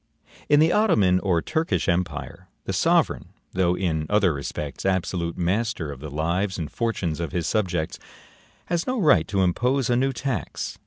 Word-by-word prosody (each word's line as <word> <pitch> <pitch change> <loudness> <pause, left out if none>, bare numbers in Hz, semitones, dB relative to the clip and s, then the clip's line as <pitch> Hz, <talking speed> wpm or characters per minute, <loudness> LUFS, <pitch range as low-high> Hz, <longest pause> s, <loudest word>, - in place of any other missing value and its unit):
In 145 0 +6
the 160 +2 +4
Ottoman 100 - +3
or 90 -5 +1
Turkish 160 +1 -1
empire, 85 -4 -2 0.2
the - - -3
sovereign, - - +2 0.3
though 90 -1 +2
in 80 -4 -1
other 105 -5 +3
respects 70 0 -5
absolute 90 -2 -1
master 90 -2 -1
of 70 - -9
the 75 +2 -7
lives 85 +7 -1
and 80 -4 -4
fortunes 95 -9 -2
of 85 -4 -4
his 85 -3 -1
subjects, 90 -7 -1 0.7
has 175 -1 -1
no 255 -1 0
right 105 - +4
to 95 -2 +1
impose 125 +8 +1
a - - +3
new 135 +2 +2
tax. 135 +1 -4
95 Hz, 165 wpm, -24 LUFS, 85-120 Hz, 0.7 s, In